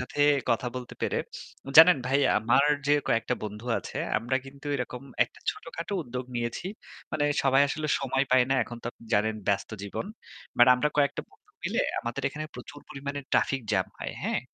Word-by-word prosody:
সাথে 125 - -7 0.3
কথা 115 +2 +1
বলতে 125 -1 -7
পেরে। - - 0 0.6
জানেন 165 -1 +10
ভাই? 135 +2 +2 0.2
আমার 120 +6 +3 0.2
যে 145 - +4
কয়েকটা 115 +2 +1
বন্ধু 105 +1 -6
আছে - - -8 0.2
আমরা 120 +4 -1
কিন্তু 140 +1 -12
এরকম 125 -1 -5 0.2
একটা - - -19
ছোটখাটো 165 +3 -7
উদ্যোগ 125 -2 -5
নিয়েছি। 120 +8 -3 0.5
মানে 145 - +1 0.2
সবাই 135 0 +4
আসলে 155 +2 -3
সময় 135 0 +1
পায় 130 -1 +5
না। - - +4
এখন 120 +1 -7
তো - - -6
আপনি - - -19
জানেন 110 +1 +2
ব্যস্ত 100 -1 0
জীবন। 100 - -4 0.5
বাট 120 - +8
আমরা 125 +4 +1
কয়েকটা 140 -2 +2
বন্ধু - - -27
মিলে - - 0 0.2
আমাদের 120 +4 -4
এখানে 150 +2 -6
প্রচুর 135 +4 -10
পরিমাণে 140 0 -5
ট্রাফিক 135 - +2
জাম 95 -2 +2
হয়। - - -5
হ্যাঁ? - - 0
130 Hz, 180 wpm, -28 LUFS, 120-140 Hz, 0.6 s, জানেন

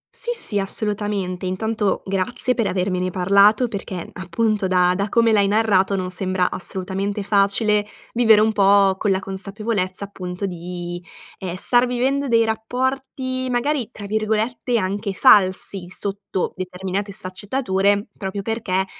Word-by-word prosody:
Sì, 475 - 0
sì, 205 - +2
assolutamente. 200 -2 -2
Intanto, 210 +2 -1
grazie 195 +6 0
per 230 -5 0
avermene 185 0 -1
parlato 200 +6 +4
perché, 195 -4 -6
appunto, 200 +2 -1
da 180 -1 +3
da 200 +1 -2
come 230 0 +3
l'hai 205 -2 +3
narrato 200 -2 +2
non 185 -1 -3
sembra 185 0 +1
assolutamente 195 +2 -2
facile 205 +1 +2 0.3
vivere 225 -3 +5
un 220 +1 +3
pò 195 -1 +4
con 205 +1 -1
la 190 - +3
consapevolezza, 195 0 -3
appunto 185 -1 -6
di, 175 -1 -6 0.4
ehm, 180 -2 -5
star 245 +6 +3
vivendo 265 +3 0
dei 230 -2 +3
rapporti, 255 +3 -2
magari, 250 0 -1
tra 205 - -9
virgolette, 220 +3 -1
anche 200 +1 -2
"falsi", 190 -2 +4
sotto 195 0 -3
determinate 185 +2 -4
sfaccettature, 200 +1 -1
proprio 195 0 -5
perché 205 -4 -1
200 Hz, 135 wpm, -21 LUFS, 185-220 Hz, 0.4 s, vivere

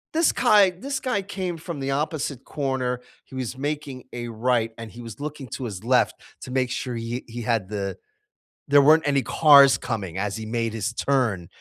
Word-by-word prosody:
this 330 0 +4
guy 200 -6 +4
this 275 0 -3
guy 250 -6 0
came 185 -3 -4
from 160 -3 -6
the 135 0 -1
opposite 145 -2 -2
corner, 130 -4 -2 0.2
he 130 - -13
was 130 0 -4
making 145 -2 -4
a 120 -1 -5
right 115 0 0
and 115 -1 -8
he 120 +5 -11
was 115 -2 -9
looking 150 -1 -5
to 130 - -5
his 100 -4 -6
left 125 +2 +3 0.2
to 130 - -9
make 130 -1 0
sure 125 -1 -3
he 115 +2 -4
he 120 +1 -6
had 115 -5 0
the 100 -2 -4 0.7
there 145 0 +6
weren't 155 +2 +5
any 140 -1 +3
cars 140 -2 +7
coming 95 -7 -4
as 100 0 -2
he 110 - -6
made 115 0 -2
his 115 +2 -2
turn- 120 -9 0
130 Hz, 195 wpm, -24 LUFS, 115-150 Hz, 0.7 s, cars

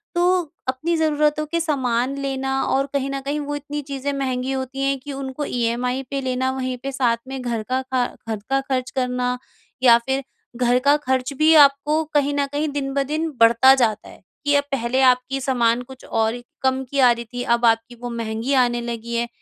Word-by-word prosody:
तो 360 +1 +3 0.3
अपनी 310 +7 0
ज़रूरतों 305 -1 +1
के 335 - +1
सामान 265 -4 0
लेना 270 0 -1
और 270 +1 +1
कहीं 275 -1 -1
न 275 - -3
कहीं 285 +2 -2
वो 290 0 -4
इतनी 290 +1 -5
चीज़ें 280 0 -4
महँगी 265 -1 -2
होती 265 0 -4
हैं 275 0 +1
कि 285 +2 -8
उनको 270 +1 -4
ईएमआई 245 +2 -1
पे 275 -1 -2
लेना, 260 0 -1
वहीं 255 -1 -3
पे 275 - -3
साथ 245 -3 +1
में 265 -1 -5
घर 235 -3 -2
का 260 +1 +1 0.5
घर 220 -1 -2
का 270 0 +2
ख़र्च 260 -2 -2
करना 250 -1 0 0.5
या 235 -2 +8
फिर 265 +1 -1 0.3
घर 245 0 +2
का 285 +2 +4
ख़र्च 260 +1 0
भी 315 +1 +5
आपको 295 +2 +5
कहीं 290 -1 +2
न 280 - +2
कहीं 300 +2 0
दिन-ब-दिन 285 +3 -1
बढ़ता 235 +3 +7
जाता 220 -5 0
है। - - -15 0.2
कि 290 - +3
अब 285 - +3
पहले 260 0 0
आपकी 255 +1 +3
सामान 245 -2 +2
कुछ 260 +1 -13
और 225 +1 -1 0.2
कम 265 0 +1
की 280 - -2
आ 250 -2 +7
रही 235 0 -3
थी 245 0 -3
अब 235 0 +2
आपकी 230 +1 +2
वो 245 - -4
महँगी 230 +2 -3
आने 240 -1 -1
लगी 235 0 -5
है। 235 0 0
265 Hz, 200 wpm, -22 LUFS, 245-280 Hz, 0.5 s, या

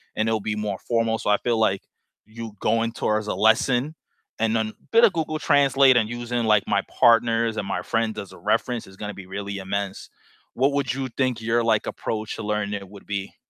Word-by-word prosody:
and 110 - 0
it'll 110 -1 +1
be 105 +1 -2
more 105 -2 -3
formal. 115 -1 0
So - - -2
I 105 - +5
feel, 120 0 0
like, 100 -3 +2 0.4
you 115 +1 -8
going 115 +1 +1
towards 110 -1 -1
a - - -1
lesson 125 +6 +2 0.4
and 115 0 +1
then 110 -1 0
a - - -12 0.2
bit 230 +1 +5
of 210 - +3
Google 155 -1 -2
Translate 140 -3 +5
and 110 -3 +2
using, 120 0 -2
like, 105 -2 +4
my 100 -1 +2
partners 115 -1 +3
and 100 - -3
my - - -2
friends 115 -1 -1
as 100 -2 -8
a - - -12
reference 120 +7 -1
is 95 - -14
gonna 105 -1 -5
be 95 - -10
really 100 +1 -5
immense. 100 0 -4 0.4
What 135 +3 +2
would 140 -4 0
you 135 0 -3
think 130 -4 0
your, 115 +1 +1
like, 110 -2 +1
approach 110 -1 -4
to 115 - -6
learning 105 -1 -1
it 100 -1 -7
would 100 0 -13
be? 100 -1 -4
110 Hz, 220 wpm, -24 LUFS, 105-120 Hz, 0.4 s, I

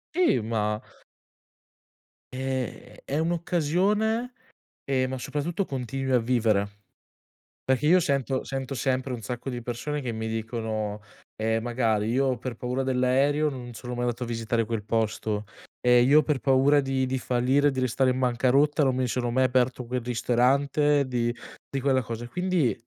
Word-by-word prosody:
Sì, 355 - +3
ma 105 -1 -1 1.5
Ehm, 130 -2 -4
è 140 - -2
un'occasione, 180 - 0 0.5
ehm, 130 -2 +1
ma 130 - -3
soprattutto 165 +8 -2
continui 135 -1 -3
a 125 - +5
vivere. 115 -4 +1 0.9
Perché 130 +3 +1
io 180 +3 +6
sento 140 -4 0
sento 135 0 -4
sempre 130 +1 -1
un 120 - -5
sacco 120 +5 -5
di 120 -1 -4
persone 125 +5 -4
che 125 -3 -3
mi 110 0 -4
dicono, 110 -2 -3 0.3
ehm, 110 +1 0
magari: 115 -3 0
"Io 130 -1 +1
per 120 0 -5
paura 125 +3 -2
dell'aereo, 135 +4 +2
non 125 -3 -7
sono 125 +2 -7
mai 120 - -2
andato 120 0 -1
a - - -3
visitare 115 0 -1
quel 110 -1 -3
posto. 110 -1 -1 0.4
Ehm, 125 0 +5
io 150 +3 +6
per 145 -2 0
paura 135 +2 +4
di 135 -1 0
di 130 +1 -1
fallire, 130 +4 +2
di 130 - -3
restare 130 +1 +2
in 125 - -2
bancarotta, 130 +4 +2
non 130 -2 +2
mi 130 0 0
sono 120 0 -1
mai 130 +1 +3
aperto 125 0 +1
quel 125 +1 -2
ristorante, 135 +4 +2
di 120 -2 0 0.4
di 135 - -2
quella 135 -1 +2
cosa." 115 +1 -5
E - - -11
quindi 180 -6 +1
130 Hz, 160 wpm, -26 LUFS, 120-140 Hz, 1.5 s, io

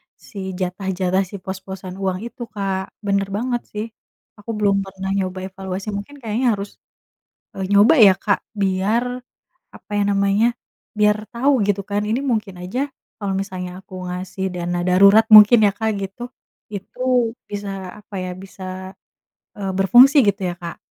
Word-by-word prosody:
si 190 -3 -7
jatah-jatah, 185 0 -1
si 200 - -8
pos-posan 190 -1 -7
uang 190 -1 -1
itu, 235 +1 -9
Kak. 195 -2 -3
Bener 200 -1 +1
banget 240 +2 -1
sih. 210 +1 -3 0.5
Aku 210 +2 -6
belum 205 -1 +2
pernah 190 0 -5
nyoba 185 -1 -2
evaluasi, 190 +1 -6
mungkin 205 +9 -7
kayaknya 230 0 0
harus, 200 +1 -5 0.9
eee, 190 - -2
nyoba 205 +8 +6
ya, 200 -5 +8
Kak. 200 0 +1
Biar, 200 +3 +1 0.7
apa - - -17
ya 205 - +2
namanya, 200 +2 +2 0.5
biar 210 0 +4 0.2
tau 265 +3 +2
gitu 200 -1 +1
kan. 205 0 -1
Ini 230 +4 +1
mungkin 215 -4 -2
aja 250 +11 -2 0.3
kalau 200 -2 -3
misalnya 185 -2 -4
aku 190 0 -17 0.2
ngasih 180 +1 -5
dana 175 0 -2
darurat, 200 +4 +6
mungkin 215 +3 +9
ya, 200 - +4
Kak, 220 +2 -1
gitu. 195 +4 -7 0.5
Itu, 245 +3 -1 0.2
bisa, 205 -1 -5 0.3
apa 205 -1 -12
ya, 180 - -4
bisa, 190 0 -8 0.6
eee, 195 -1 -3
berfungsi 245 +9 +7
gitu 200 0 +1
ya, - - -5
Kak? 170 -1 -7
200 Hz, 150 wpm, -21 LUFS, 190-215 Hz, 0.9 s, mungkin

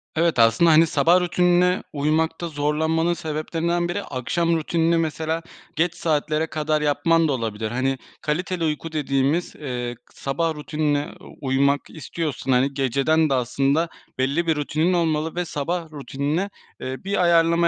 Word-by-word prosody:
Evet, 165 -5 +2
aslında, 115 +9 +5
hani, 160 +1 +6
sabah 165 +5 +4
rutinine 180 +1 +2
uymakta 160 +3 0
zorlanmanın 160 +3 0
sebeplerinden 165 +2 -2
biri, 200 +3 -2
akşam 165 +6 -1
rutinini, 165 +1 +1
mesela, 160 0 -1 0.3
geç 175 +1 +1
saatlere 155 0 0
kadar 155 0 -1
yapman 165 +2 +2
da - - 0
olabilir. 110 -2 -3
Hani, 130 +2 0 0.2
kaliteli 175 +3 -2
uyku 155 +1 -2
dediğimiz, 145 +2 0
eee, 125 -4 -4
k - - -26
sabah 160 +4 -2
rutinine 150 -1 -1 0.3
uymak 140 +1 +2
istiyorsun. 155 -4 -4
Hani, 130 +2 +2
geceden 140 +4 +2
de - - +2
aslında 135 +6 +1 0.3
belli 140 +6 0
bir 160 - +3
rutinin 155 +4 0
olmalı 160 -2 0
ve 180 0 -1
sabah 165 +2 -3
rutinine, 145 +6 -2 0.3
eee, 130 +1 -5
bir 195 -1 0
ayarlama 170 0 +4
155 Hz, 145 wpm, -23 LUFS, 140-170 Hz, 0.3 s, hani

